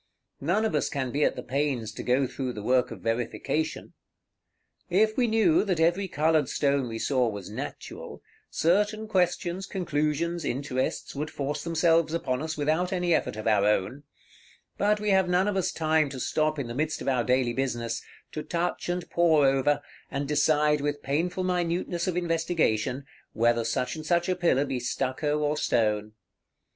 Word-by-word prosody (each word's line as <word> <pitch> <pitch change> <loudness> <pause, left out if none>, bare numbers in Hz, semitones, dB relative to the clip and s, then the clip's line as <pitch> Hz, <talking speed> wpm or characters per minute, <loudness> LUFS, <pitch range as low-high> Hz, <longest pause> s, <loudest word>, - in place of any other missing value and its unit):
None 180 +10 +1
of 220 - -1
us 150 - +1
can 130 -3 -2
be 145 +3 +1
at - - +2
the - - -6
pains 130 -4 -1
to - - -7
go 130 +2 +2
through 130 0 -4
the 105 - -7
work 125 +2 +2
of - - -9
verification. 125 +7 -2 1.0
If 215 +4 +3
we 250 -2 +2
knew 225 +10 +3
that 185 -5 -1
every 175 +4 +2
colored 155 -3 +2
stone 140 -3 +1
we 115 -1 -5
saw 125 0 +1
was 100 -2 -7
natural, - - -7 0.3
certain 210 +6 +1
questions, 180 -1 0
conclusions, 170 -1 -1
interests, 130 -1 -2
would 150 +2 -3
force 145 +1 -3
themselves 165 -1 +2
upon 130 -6 -1
us 155 0 -4
without 155 +5 0
any 180 -2 +1
effort 155 - 0
of 110 - -6
our 105 -3 +3
own; 105 +6 0 0.7
but 210 +1 +2
we 210 -1 0
have 190 -2 +3
none 180 +2 +3
of 205 - 0
us 190 - 0
time 155 -2 +1
to 135 - -7
stop 155 +4 0
in 140 - -2
the 120 - -6
midst 155 +4 -1
of - - -8
our 130 -3 +2
daily 125 -1 +1
business, 120 -3 -2 0.3
to 155 - -4
touch 170 +2 -2
and 175 0 -2
pore 160 -4 +4
over, 135 +2 +2 0.3
and 140 +1 -3
decide 150 0 +3
with 145 0 -2
painful 170 +7 -1
minuteness 175 -1 -1
of 180 -1 -1
investigation, 160 -7 0 0.3
whether 115 +1 +2
such 115 +5 -1
and 155 0 -7
such 175 0 +2
a 185 - +1
pillar 170 -6 +2
be 135 -2 -2
stucco 135 +4 -1
or 150 0 +1
stone. 105 -6 0
150 Hz, 175 wpm, -27 LUFS, 130-175 Hz, 1.0 s, pore